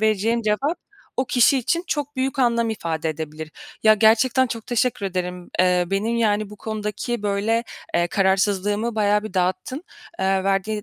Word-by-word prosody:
vereceğim 220 +2 +1
cevap 270 +11 0 0.4
o 260 - +1
kişi 250 +2 +4
için 340 +8 -1
çok 290 -1 -3
büyük 265 +1 -1
anlam 235 -3 +2
ifade 165 -6 -3
edebilir. 155 0 -6 0.3
Ya, 215 0 +7
gerçekten 230 +5 +4
çok 230 -2 -6
teşekkür 240 -4 0
ederim. 180 -1 -4
Eee, 180 -1 +3
benim, 220 +4 0
yani, 215 -2 +1
bu 210 - -10
konudaki, 215 +2 -4
böyle, 210 +3 0 0.3
eee, 175 0 +3
kararsızlığımı 205 +4 +1
bayağı 210 -1 +2
bir 215 -3 -8
dağıttın. 185 - -1 0.3
Eee, 190 0 +1
verdiğin 195 +2 0
210 Hz, 155 wpm, -22 LUFS, 190-235 Hz, 0.4 s, Ya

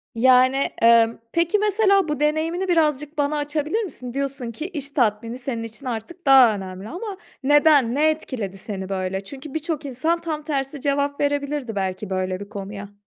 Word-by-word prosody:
Yani, 255 +2 +5 0.3
emm, 230 0 +5
peki, 340 +4 +2
mesela 400 -3 +3
bu 300 -2 -2
deneyimini 320 +5 0
birazcık 300 -3 +1
bana 290 +1 +1
açabilir 300 +8 -1
misin? 255 - -7
Diyorsun 275 -3 -3
ki 305 +9 -5
iş 285 -6 -6
tatmini 230 -2 0
senin 245 -3 -4
için 225 +3 -9
artık 255 +9 -6
daha 260 -5 +7
önemli 190 +1 -7
ama 390 +3 -6 0.3
neden, 290 -3 +4
ne 305 +2 +4
etkiledi 245 -11 -4
seni 190 -1 -6
böyle? 190 0 -2
Çünkü 270 +6 -9
birçok 315 -1 -3
insan 315 +6 -1
tam 310 -2 -4
tersi 280 -2 -3
cevap 285 0 0
verebilirdi 285 -4 -1
belki 190 +1 -3
böyle 185 -1 -2
bir 200 0 -9
konuya. 200 0 -8
275 Hz, 165 wpm, -23 LUFS, 225-305 Hz, 0.3 s, daha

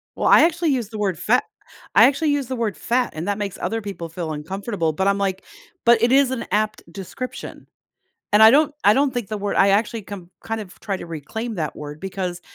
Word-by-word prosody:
Well, - - -1
I - - +7
actually 335 0 +2
use 245 -7 -1
the 220 - -7
word 195 -5 -1
fa 245 +4 +3 0.5
I - - +8
actually 290 +2 +1
use 285 -3 -1
the 260 - -3
word 230 -4 -2
fat, 245 0 0
and 160 +4 -5
that 205 -1 0
makes 205 -2 -4
other 225 +5 -2
people 195 -5 -6
feel 165 -1 -5
uncomfortable, 170 +2 -3
but 190 +5 -1
I'm, 200 0 +2
like 190 -1 -2 0.4
but 235 -1 +5
it 235 +1 +3
is 270 -1 +4
an 255 - -3
apt 215 +1 0
description, 195 +7 -8 0.7
and 210 - +6
I 220 - +10
don't 295 +2 +4
I 205 - +7
don't 275 +1 +1
think 240 -5 -3
the 215 - -3
word 205 0 -3
I 195 - +5
actually 215 +2 +1
come 190 -3 -9
kind 225 0 -3
of 190 -3 -12
try 200 -2 -2
to - - -8
reclaim 215 - -5
that 155 -5 -3
word 150 0 -8
because 185 -2 -4
205 Hz, 230 wpm, -22 LUFS, 185-240 Hz, 0.7 s, I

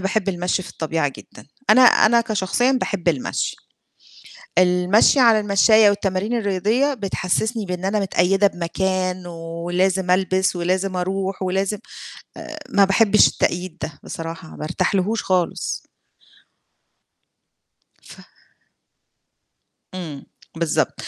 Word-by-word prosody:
باحب 195 +1 -1
المشي 180 0 -1
في - - -10
الطبيعية 160 -2 -2
جدًا، - - -15 0.2
أنا 255 - +6
أنا 235 -1 +5
كشخصيًا 225 +3 0
باحب 200 -9 -2
المشي. 145 -7 -2 1.0
المشي 180 +8 +4
على 230 -4 +5
المشّاية 210 +1 +4
والتمارين 200 +2 -2
الرياضية 220 +7 0
بتحسسني 210 +1 -2
بإن 180 0 -5
أنا 205 +2 0
متقيدة 195 +1 +2
بمكان 185 +1 -2
ولازم 175 +3 -2
ألبِس 190 0 +1
ولازم 185 +2 -1
أروح 190 +1 -3
ولازم 195 +3 -1 0.7
آآ - - -8
ما 200 0 +4
باحبش 210 +2 +4
التقييد 180 0 -2
ده، 150 -2 -6
بصراحة 165 -1 -8
ما - - -7
أرتاح 170 +5 -1
لهوش 200 +4 0
خالص. 180 -2 -1 2.2
ف - - -14 1.7
إمم، 160 -7 -7 0.3
بالضبط 165 -2 0
190 Hz, 110 wpm, -21 LUFS, 180-205 Hz, 2.2 s, أنا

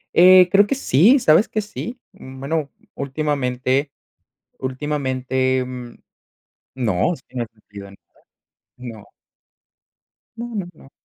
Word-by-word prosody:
Eh, 180 0 +8
creo 205 +1 +5
que 275 - 0
sí. 240 - +4
¿Sabes 160 +1 +4
que 215 - -2
sí? 235 +4 -7
Mm, 130 0 -12
bueno, 145 +1 -2 0.2
últimamente 140 -1 -1 0.7
últimamente, 130 -1 -1
em, 125 -2 -6 0.8
no, 120 - 0
sí, 130 - -21
no 120 -2 -1
he - - -12
sentido 100 -2 -12
nada, 100 - -15 0.8
no. 115 -5 -10 1.3
No, 235 0 -7
no, 190 -4 -3
no. 135 -2 -18
135 Hz, 120 wpm, -21 LUFS, 125-175 Hz, 1.3 s, Eh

